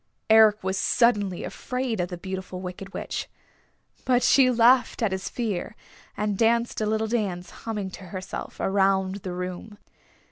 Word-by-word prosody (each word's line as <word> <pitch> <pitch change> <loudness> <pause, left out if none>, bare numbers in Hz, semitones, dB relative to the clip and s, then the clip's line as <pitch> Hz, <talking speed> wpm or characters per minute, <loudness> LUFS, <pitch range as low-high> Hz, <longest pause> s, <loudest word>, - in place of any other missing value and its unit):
Eric 220 -2 +6
was 190 0 -1
suddenly 205 -6 +2
afraid 250 -4 -3
of 180 - 0
the 180 - -6
Beautiful 185 0 -6
Wicked 185 +1 -7
Witch. - - -5 0.7
But 250 -1 +2
she 265 -2 +5
laughed 245 0 +4
at 215 - +2
his 190 0 -3
fear, 210 -4 -3 0.4
and 210 -2 -1
danced 235 0 +2
a 215 - 0
little 220 +1 0
dance, 200 -6 -2
humming 210 -4 -5
to 190 - -10
herself, 185 +1 -7
around 190 0 +1
the 185 -2 -6
room. 180 +4 -6
200 Hz, 150 wpm, -25 LUFS, 190-225 Hz, 0.7 s, Eric